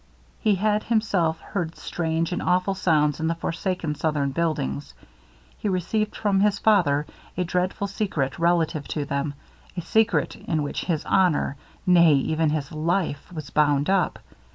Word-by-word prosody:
He 210 -2 +3
had 210 +2 +1
himself 200 -9 +1
heard 175 -5 -4
strange 165 0 -2
and 180 - -2
awful 180 +2 +1
sounds 155 -6 +2
in 160 - 0
the 165 - 0
forsaken 165 -1 -2
southern 150 -2 -1
buildings; 135 - -2 0.6
he 210 - -1
received 200 +4 -1
from 200 -2 +1
his 205 0 +3
father 165 -11 +3 0.3
a 180 - +1
dreadful 180 +3 -1
secret 190 -9 -2
relative 165 -3 +1
to 150 -2 -3
them 140 +1 -2 0.4
a - - -1
secret 220 +6 +1
in 155 -3 -2
which 145 - -3
his 165 -4 -1
honor, 175 -7 +2 0.3
nay 170 -4 +6
even 155 +3 +1
his 150 -2 -2
life, 160 0 -1
was 155 -5 -7
bound 145 +1 +2
up. 190 -4 +1
170 Hz, 155 wpm, -24 LUFS, 150-190 Hz, 0.6 s, nay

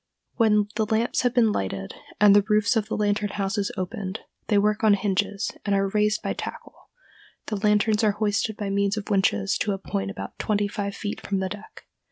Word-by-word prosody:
When 210 -3 +3
the 220 -1 +1
lamps 225 +2 +1
have 245 -1 0
been 230 -3 +4
lighted 95 - -3 0.3
and 205 -1 +7
the 205 - +7
roofs 215 +3 +3
of 215 -2 0
the - - -3
lantern 205 0 0
houses 195 0 -2
opened,—they 200 +2 -4
work 210 +2 +1
on 210 -2 +6
hinges, 200 0 -1
and 200 -1 +1
are 195 0 +1
raised 210 +1 +1
by - - -1
tackle,—the 480 - -9
lanterns 210 +1 +2
are 210 -2 +3
hoisted 210 +1 -1
by 200 -2 -3
means 200 +1 +1
of 210 0 -5
winches 100 - +1
to 205 - 0
a - - -3
point 95 - -3
about 95 0 -8
twenty 205 -1 0
five 200 0 -4
feet 205 -1 -5
from 200 - -2
the 190 0 -1
deck. 205 +2 -10
205 Hz, 195 wpm, -25 LUFS, 195-215 Hz, 0.3 s, and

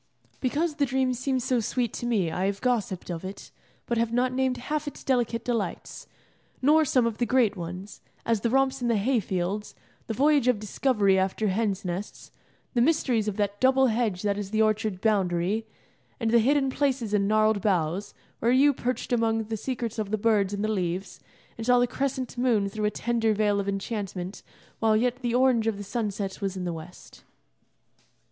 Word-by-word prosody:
Because 295 +4 -1
the 285 - +3
dream 260 0 +1
seems 255 0 -1
so 255 -1 +1
sweet 235 +1 -1
to 240 - -4
me 200 -9 +1
I 185 +4 0
have 200 0 -2
gossiped 210 -8 -1
of 165 0 -5
it, 190 +1 -8 0.3
but 235 -1 -1
have 230 0 0
not 250 +1 +1
named 260 -1 0
half 300 +4 -3
its 290 - -7
delicate 240 -3 0
delights, 235 -4 -3 0.5
nor 305 +4 +4
some 255 -3 +3
of 230 -2 -2
the 240 - +2
great 245 -5 +3
ones: 180 +3 -7 0.2
as 230 -3 +1
the 235 - +1
romps 270 +1 +2
in 240 - 0
the 230 -2 +2
hay 240 +5 +2
fields, 190 +1 -3 0.3
the 225 - -3
voyage 285 0 +3
of 250 -3 +4
discovery 205 -2 +2
after 195 +3 0
hens' 200 0 -1
nests, 180 +3 -5 0.4
the 240 - +2
mysteries 245 -6 +2
of 210 -1 -2
that 205 -1 -1
double 265 +1 +5
hedge 215 -6 -1
that 205 -1 0
is 200 -2 -5
the 215 +1 -1
orchard 215 -3 +1
boundary, 200 0 +1 0.5
and 225 -2 0
the 235 - +6
hidden 270 +3 +2
places 260 -6 0
in 200 -1 +2
gnarled 215 -1 +3
boughs, 180 -1 0 0.2
where 230 - +1
you 280 +3 +5
perched 250 0 -3
among 225 -1 +1
the 220 +1 -4
secrets 235 -1 -4
of 210 -2 -2
the 215 - 0
birds 205 -3 +2
and 205 0 -3
the - - +1
leaves, 185 -1 -3 0.4
and 225 - -4
saw 245 0 +6
the 245 - +4
crescent 260 0 -3
moon 230 -5 +2
through 210 +2 -3
a - - +3
tender 225 0 0
veil 205 -1 +2
of 200 0 -2
enchantment 195 -2 -4 0.4
while 220 -1 +3
yet 245 +2 +1
the 240 -2 -2
orange 250 -3 +3
of 220 -3 0
the 205 - -6
sunset 205 -2 -3
was 195 -1 -2
in 185 - -4
the 175 -1 -2
west. 165 +2 -11
220 Hz, 195 wpm, -26 LUFS, 200-250 Hz, 0.5 s, the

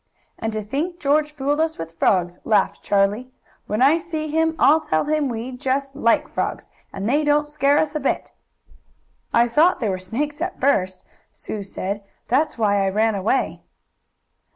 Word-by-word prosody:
"And 225 - -2
to 215 -1 -3
think 310 - -3
George 300 +2 +2
fooled 290 +1 0
us 320 0 -1
with 165 0 -8
frogs," 180 -2 +1
laughed 215 - +1
Charlie. 205 +5 +1 0.4
"When 215 +4 +1
I 300 +5 +5
see 320 -3 -4
him 320 +1 +1
I'll 315 +2 +5
tell 155 - 0
him 300 -2 0
we 235 +2 -4
just 270 +1 -2
like 230 -5 +2
frogs, - - -4 0.2
and 195 - -4
they 290 +5 +2
didn't 295 0 +2
scare 285 -1 +2
us 305 -1 +1
a 305 - -1
bit." 275 - -2 1.0
"I 235 +1 +4
thought 310 +9 +3
they 225 - -1
were 185 -1 -2
snakes, 290 - -4
at 355 +1 -3
first," 185 -9 +1 0.3
Sue 215 - -6
said. 200 +1 -5 0.3
"That's 275 +5 +1
why 205 -3 +2
I 195 - +1
ran 220 +3 +2
away." 205 +7 -1
260 Hz, 175 wpm, -22 LUFS, 210-300 Hz, 1.0 s, I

